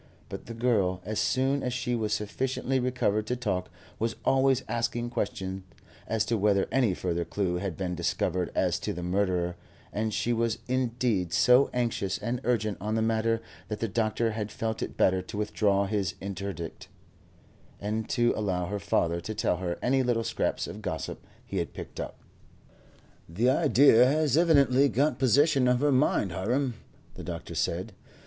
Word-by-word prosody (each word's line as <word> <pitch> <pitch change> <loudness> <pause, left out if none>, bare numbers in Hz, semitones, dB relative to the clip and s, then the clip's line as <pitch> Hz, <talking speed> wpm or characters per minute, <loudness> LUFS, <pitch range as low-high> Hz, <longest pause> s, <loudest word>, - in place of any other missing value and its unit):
But - - -7
the 115 - -7
girl, 105 -7 +1
as 110 +1 -2
soon 135 +2 +1
as 125 - -2
she 125 -1 -1
was 110 -3 -1
sufficiently 130 +5 -1
recovered 120 -4 0
to 125 - 0
talk, 100 -7 -2 0.3
was 115 0 -1
always 135 -1 +3
asking 120 0 -2
questions 95 -3 -3 0.5
as 110 -2 0
to 115 -2 0
whether 100 -1 +3
any 120 -8 +2
further 85 -1 -1
clue 90 -1 -1
had 90 -2 -4
been 90 -2 -2
discovered 90 0 -1
as 90 -2 +1
to 90 - -3
the 90 - -6
murderer, 90 -1 0 0.4
and 110 +1 -1
she 120 +3 0
was 115 -1 0
indeed 120 -7 0
so 125 +9 +5
anxious 115 -6 -1
and 120 +1 -3
urgent 110 -6 0
on 105 +2 -1
the 110 - +1
matter 115 0 +1 0.2
that 105 - -4
the 115 - -1
doctor 110 +1 0
had 105 -1 -4
felt 110 -2 -3
it - - -5
better 95 0 +3
to 95 +3 -8
withdraw 100 -1 +1
his 100 -1 -1
interdict, 100 -3 -6 0.9
and 110 +2 -3
to 120 0 +2
allow 95 -4 -1
her 100 +3 -3
father 85 -2 0
to 110 - -5
tell 100 -4 +1
her 90 -1 -3
any 135 +2 +3
little 120 -2 +1
scraps 115 - -1
of - - -8
gossip - - -4 0.2
he - - -5
had - - -2
picked - - -8
up. - - -5 1.1
"The 115 +10 +2
idea 135 -5 +6
has 150 -1 +2
evidently 140 -5 +4
got 135 0 +1
possession 135 +1 +4
of 125 0 +3
her 145 +1 +3
mind, 125 -7 +2
Hiram," 120 +9 0 0.4
the - - -9
doctor - - -6
said. - - -2
110 Hz, 170 wpm, -28 LUFS, 95-125 Hz, 1.1 s, idea